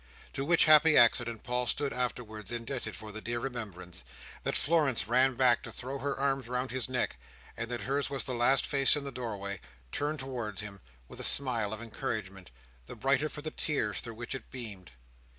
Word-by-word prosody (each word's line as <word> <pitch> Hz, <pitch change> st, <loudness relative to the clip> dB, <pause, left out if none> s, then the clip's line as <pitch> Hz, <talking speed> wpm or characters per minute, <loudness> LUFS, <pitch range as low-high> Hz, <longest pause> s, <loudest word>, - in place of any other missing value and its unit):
To 135 Hz, -, -2 dB
which 170 Hz, +4 st, +5 dB
happy 155 Hz, 0 st, +7 dB
accident 115 Hz, -1 st, +4 dB
Paul 125 Hz, 0 st, 0 dB
stood 145 Hz, -1 st, 0 dB
afterwards 115 Hz, -4 st, -3 dB
indebted 120 Hz, -1 st, -3 dB
for 110 Hz, -1 st, -9 dB
the 110 Hz, +1 st, -5 dB
dear 120 Hz, +1 st, -3 dB
remembrance, 105 Hz, -9 st, -5 dB, 0.4 s
that -, -, 0 dB
Florence 145 Hz, -9 st, +2 dB
ran 130 Hz, +2 st, +3 dB
back 125 Hz, -2 st, +4 dB
to -, -, -7 dB
throw 130 Hz, +2 st, -5 dB
her 140 Hz, 0 st, -2 dB
arms 135 Hz, -2 st, 0 dB
round 125 Hz, +1 st, -2 dB
his 130 Hz, -1 st, 0 dB
neck, 125 Hz, -1 st, -1 dB, 0.4 s
and 115 Hz, 0 st, -4 dB
that 120 Hz, -2 st, -2 dB
hers 140 Hz, +5 st, -1 dB
was 140 Hz, -1 st, -1 dB
the 130 Hz, -, -3 dB
last 120 Hz, +3 st, +4 dB
face 140 Hz, 0 st, +5 dB
in 145 Hz, -, -2 dB
the 140 Hz, -, -5 dB
doorway: 100 Hz, -6 st, -5 dB, 0.3 s
turned 150 Hz, +2 st, -1 dB
towards 125 Hz, -7 st, -4 dB
him 100 Hz, -2 st, -8 dB, 0.3 s
with -, -, -12 dB
a -, -, -3 dB
smile 120 Hz, -7 st, +3 dB
of 110 Hz, +1 st, -5 dB
encouragement, 100 Hz, -4 st, -5 dB, 0.4 s
the -, -, -8 dB
brighter 135 Hz, +5 st, +1 dB
for 150 Hz, -, -8 dB
the 155 Hz, -, -3 dB
tears 110 Hz, -10 st, 0 dB
through 115 Hz, -1 st, -7 dB
which 120 Hz, +3 st, -5 dB
it 135 Hz, -4 st, -7 dB
beamed. 105 Hz, -8 st, -8 dB
125 Hz, 195 wpm, -31 LUFS, 110-135 Hz, 0.4 s, happy